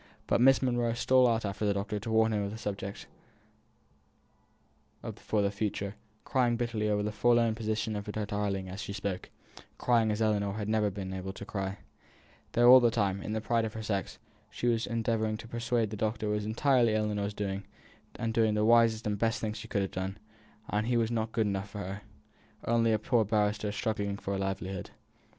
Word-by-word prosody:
But - - +2
Miss 135 +1 +6
Monro 120 -2 +1
stole 130 +1 +4
out 115 -2 +1
after 100 +1 -3
the 100 -1 +2
doctor 100 +1 -2
to 115 - -6
warn 110 0 +3
him 105 -1 0
off 100 - -2
the 110 - -6
subject 100 -2 -5 2.1
for 105 -2 0
the 100 - +1
future, 100 -1 -2 0.3
crying 125 -4 +2
bitterly 115 -3 -1
over 105 0 +1
the 105 - -1
forlorn 115 +1 +3
position 110 0 -2
of 105 0 -5
her - - -3
darling 100 -2 -2
as 95 +3 -6
she 100 - -5
spoke 100 -2 -4 0.5
crying 115 -3 +3
as 105 0 -1
Ellinor 105 -2 +1
had 105 0 -4
never 110 -1 +2
yet 100 - -3
been 95 -2 -4
able 95 0 -5
to 100 - -8
cry: 95 -2 -3 0.8
though 120 +1 +7
all 130 - +11
the 120 -1 +4
time, 100 -4 0
in 105 - -4
the 110 - -1
pride 115 +1 +1
of 110 -1 -4
her 110 - -5
sex, 100 -2 -2 0.3
she - - -5
was 115 -1 +2
as - - -7
endeavouring 110 -1 0
to 115 - -10
persuade 115 -1 -1
the - - -3
doctor 110 +1 -1
it - - +1
was 105 0 -1
entirely 120 -1 +3
Ellinor's 105 -1 -1
doing, 100 -1 -3 0.5
and 115 -1 -2
the 110 -2 +2
wisest 115 -1 +4
and 105 -1 -1
best 115 0 +1
thing 110 -1 -2
she 110 0 -8
could 100 -3 0
have 95 - -3
done, 95 +2 -4 0.5
as 105 +1 0
he 120 0 +1
was 115 0 +1
not 110 -1 -1
good 110 -1 +1
enough 100 0 -2
for 100 - -9
her, 100 +1 -5 0.6
only 115 -1 +3
a 110 - +3
poor 115 +2 +2
barrister 105 0 0
struggling 100 -2 -2
for 100 - -4
a 95 - -1
livelihood. 95 -1 -3
110 Hz, 210 wpm, -30 LUFS, 100-115 Hz, 2.1 s, all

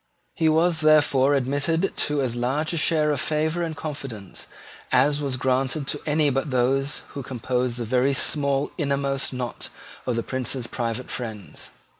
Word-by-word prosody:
He 160 -1 +2
was 160 +1 +3
therefore 145 -3 +5
admitted 145 +7 0
to 145 -2 +1
as 120 -2 -1
large 135 +7 0
a - - -1
share 155 -1 +3
of 145 -1 0
favour 155 +2 0
and 165 -2 -3
confidence 130 - -6 0.4
as 145 +3 +4
was 135 -3 -1
granted 130 +2 0
to 145 - -1
any 150 -1 +3
but 135 +3 -1
those 135 +3 +1
who 140 - -6
composed 125 -1 -2
the 120 - -3
very 130 +4 +2
small 140 0 +2
inmost 140 -2 0
knot 125 -4 -4 0.4
of 125 - +1
the 115 - -1
Prince's 130 -1 -2
private 115 +1 -3
friends. 110 -5 -6
135 Hz, 160 wpm, -24 LUFS, 125-150 Hz, 0.4 s, therefore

